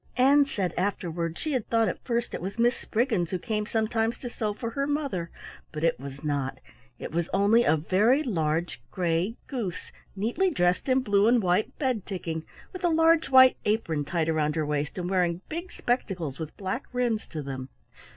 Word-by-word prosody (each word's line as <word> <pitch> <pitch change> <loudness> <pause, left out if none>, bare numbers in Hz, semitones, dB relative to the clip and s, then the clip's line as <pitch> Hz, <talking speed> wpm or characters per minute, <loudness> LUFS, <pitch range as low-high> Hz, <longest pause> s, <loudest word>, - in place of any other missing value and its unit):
Ann 280 +3 +6
said 190 - -2
afterward 170 -4 -2
she 310 - -3
had 255 -6 -1
thought 225 -1 +2
at - - -4
first 235 -1 -1
it - - -4
was 195 +4 -5
a - - +1
Miss 240 +1 +4
Spriggins 220 - 0
who 185 - -1
came 210 +1 -2
sometimes 225 +1 0
to 245 - -7
sew 215 -3 -2
for 230 +2 -5
her 275 +3 -1
mother, 280 - -2 0.4
but 155 0 -5
it 165 -5 +2
was 140 +2 -8
not; 140 -3 -1 0.4
it - - -7
was 170 +1 -1
only 205 +4 +4
a 160 - +4
very 210 - +3
large 165 - -1
gray 175 +4 0
goose 215 - -5 0.2
neatly 235 - +1
dressed 180 - +1
in 260 0 +4
blue 205 -3 +3
and 235 -2 +4
white 180 +3 +1
bed 255 -8 0
ticking, 165 -5 -4 0.3
with 370 - -8
a 350 - +4
large 325 0 +4
white 260 -1 +7
apron 190 -9 0
tied 160 +2 -1
round 155 -1 +1
her 155 -2 0
waist 150 +2 -2
and 175 -1 -2
wearing 180 -2 +1
big 340 +3 -5
spectacles 180 - -2
with 160 -2 -6
black 195 +7 -3
rims 245 -3 0
to 155 -2 -5
them. 135 -1 -6
200 Hz, 195 wpm, -27 LUFS, 165-245 Hz, 0.4 s, white